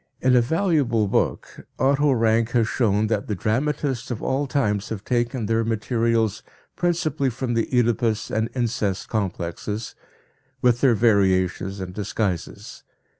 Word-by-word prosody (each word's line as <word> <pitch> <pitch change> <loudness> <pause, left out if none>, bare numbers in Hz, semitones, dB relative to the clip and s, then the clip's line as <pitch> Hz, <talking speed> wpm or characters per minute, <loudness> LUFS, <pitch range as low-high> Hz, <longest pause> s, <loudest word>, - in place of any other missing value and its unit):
In 130 0 +3
a 125 - +6
valuable 140 - +1
book, - - -2
Otto 140 +2 +3
Rank 115 -1 +2
has 115 -3 +3
shown 110 -3 +1
that 110 -2 -1
the 105 - -2
dramatists 130 +5 -1
of 120 - -4
all 140 +2 0
times 105 -7 0
have 105 -2 -6
taken 120 -1 -1
their 115 +2 +1
materials 115 -1 0 0.3
principally 160 -5 0
from 125 0 -3
the 115 -1 0
Oedipus 115 -3 +1
and 110 +1 0
incest 110 -6 -1
complexes, 105 +1 -3 0.7
with 120 -1 +2
their 130 -4 +5
variations 95 -3 +2
and 90 -1 -6
disguises. 100 -3 -4
115 Hz, 135 wpm, -23 LUFS, 105-125 Hz, 0.7 s, a